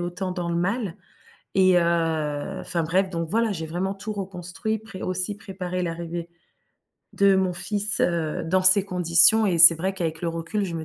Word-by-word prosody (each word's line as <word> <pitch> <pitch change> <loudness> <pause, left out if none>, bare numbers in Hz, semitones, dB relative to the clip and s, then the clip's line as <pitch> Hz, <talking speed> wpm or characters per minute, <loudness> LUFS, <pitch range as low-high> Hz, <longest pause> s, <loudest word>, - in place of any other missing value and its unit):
autant 180 +2 -4
dans 175 -2 -4
le 170 - -2
mal 195 +1 -2 0.6
et, 185 -1 +4
heu 165 0 -1
enfin 170 -2 -3
bref, 185 +3 0
donc 165 -2 -4
voilà, 225 +3 0
j'ai 160 -5 -5
vraiment 185 +4 -3
tout 205 +2 -6
reconstruit, 195 +2 -5
pré 210 -3 -11
aussi 185 +3 -2
préparé 185 -2 -6
l'arrivée 170 0 -5 0.8
de 200 -1 +3
mon 190 -1 0
fils, 205 +4 -2
heu, 165 -3 -1
dans 185 +3 +1
ces 190 +1 +8
conditions 180 +3 +4
et 175 -4 0
c'est 165 +1 +9
vrai 190 +4 -3
qu'avec 165 -3 -4
le 170 - -1
recul, 165 +5 -3
je 175 -3 -5
me 160 -1 -5
180 Hz, 185 wpm, -23 LUFS, 170-195 Hz, 0.8 s, c'est